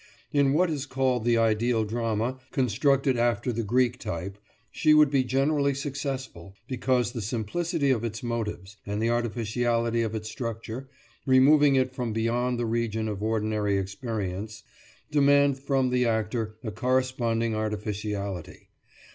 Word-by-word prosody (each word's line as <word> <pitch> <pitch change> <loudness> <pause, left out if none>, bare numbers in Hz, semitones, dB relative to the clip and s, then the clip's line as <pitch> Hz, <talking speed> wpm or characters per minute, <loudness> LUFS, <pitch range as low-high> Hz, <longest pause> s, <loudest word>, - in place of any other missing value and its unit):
In 140 -2 +3
what 175 +2 +3
is 145 -2 -3
called 130 -3 0
the 120 -1 +3
ideal 115 0 +2
drama, 115 +3 -2
constructed 135 +2 +2
after 120 0 +1
the 115 - -1
Greek 125 +3 +1
type, 100 -1 -5 0.3
she 155 -1 +4
would 150 -2 +6
be 135 -2 +3
generally 140 +2 +1
successful, 135 - -5
because 125 -2 0
the 120 -2 -5
simplicity 140 - -1
of 115 -3 0
its 115 0 -4
motives 105 -4 -4
and 105 +1 -3
the 115 +1 +1
artificiality 115 0 0
of 110 -1 -2
its 110 0 -4
structure, 115 +3 -5 0.4
removing 140 +2 +6
it 130 -1 +1
from 120 -4 -3
beyond 120 +2 0
the 120 - -1
region 110 -1 -1
of 105 -2 -4
ordinary 110 -2 0
experience, 100 +1 -4 0.5
demand 140 -1 +4
from 135 -2 0
the 125 -1 +2
actor 110 0 -1
a 110 - -3
corresponding 120 -1 0
artificiality. 105 -3 -4
120 Hz, 140 wpm, -27 LUFS, 110-130 Hz, 0.5 s, would